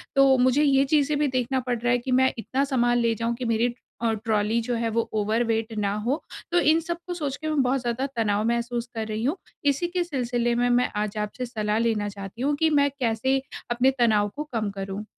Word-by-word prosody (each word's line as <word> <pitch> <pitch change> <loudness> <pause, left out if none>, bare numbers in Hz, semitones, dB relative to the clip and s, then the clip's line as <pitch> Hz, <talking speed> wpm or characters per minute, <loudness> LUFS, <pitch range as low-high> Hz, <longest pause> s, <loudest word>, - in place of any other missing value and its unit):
तो 275 -1 +6
मुझे 255 +3 +3
ये 275 -2 +4
चीज़ें 290 0 +2
भी 295 - +2
देखना 260 0 0
पड़ 250 -1 -2
रहा 240 +1 +1
है 245 - +4
कि 255 +2 -5
मैं 260 +1 +4
इतना 260 +4 -1
सामान 240 -3 +2
ले 230 -1 +2
जाऊँ 230 +2 -1
कि 250 - -5
मेरी 230 +1 +1 0.3
अ, 230 -1 +1
ट्रॉली 215 0 0
जो 240 +1 -2
है, 230 0 -1
वो 230 +1 -1
ओवरवेट 225 +1 0
ना 200 -1 0
हो, 275 +7 0 0.3
तो 350 - +4
इन 320 0 +4
सबको 340 +2 -5
सोच 290 -6 -3
के 310 - -6
मैं 305 -2 +2
बहुत 260 +1 +1
ज़्यादा 240 +2 -1
तनाव 210 -2 +1
महसूस 235 0 -1
कर 220 -1 -3
रही 215 +1 -3
हूँ। 290 +9 0 0.3
इसी 285 +5 +2
के 355 0 -1
सिलसिले 245 -6 -1
में, 245 +1 +2
मैं 245 +1 +3
आज 210 0 -2
आपसे 210 +4 -3
सलाह 215 -3 -1
लेना 220 -3 0
चाहती 200 +2 -8
हूँ 285 +2 +1
कि 320 - +4
मैं 285 -2 +3
कैसे 260 +3 +1 0.3
अपने 245 +2 +3
तनाव 215 -3 +3
को 300 - -3
कम 220 -3 0
करूँ? 195 +2 -5
240 Hz, 225 wpm, -25 LUFS, 225-270 Hz, 0.3 s, तो